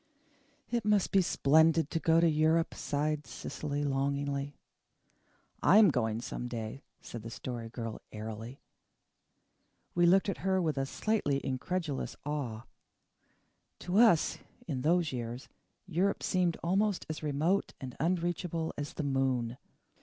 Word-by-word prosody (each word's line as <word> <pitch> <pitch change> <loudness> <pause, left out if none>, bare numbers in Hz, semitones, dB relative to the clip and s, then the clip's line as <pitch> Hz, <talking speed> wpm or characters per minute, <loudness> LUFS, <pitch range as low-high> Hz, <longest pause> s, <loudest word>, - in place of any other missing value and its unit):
"It 235 -2 0
must 210 -2 +2
be 195 - +5
splendid 160 -1 +3
to 165 - 0
go 165 0 +4
to 170 - +5
Europe," 160 +1 +2
sighed 150 0 -2
Cecily 145 +1 -4
longingly. 140 0 -1 1.1
"I 200 - +6
am 210 -6 +7
going 115 -4 0
some 120 - -5
day," 115 +2 -5 0.2
said 120 - -8
the 115 - -7
Story 115 0 -6
Girl 115 -1 -6
airily. 110 +4 -7 1.3
We 175 0 +4
looked 190 +3 +5
at 195 -8 -2
her 190 +3 +1
with 155 -5 0
a 135 - -1
slightly 175 -7 0
incredulous 145 +3 -2
awe. 130 -7 -3 1.2
To 180 +4 +1
us, 225 -9 +5 0.3
in 135 -6 -2
those 165 +2 +2
years, 120 +1 -5 0.4
Europe 190 +2 0
seemed 180 -3 +1
almost 195 +3 +1
as 155 - -5
remote 155 +6 0
and 130 -2 -7
unreachable 170 0 -1
as 145 0 -4
the - - -2
moon. 130 -3 0
150 Hz, 135 wpm, -31 LUFS, 130-175 Hz, 1.3 s, am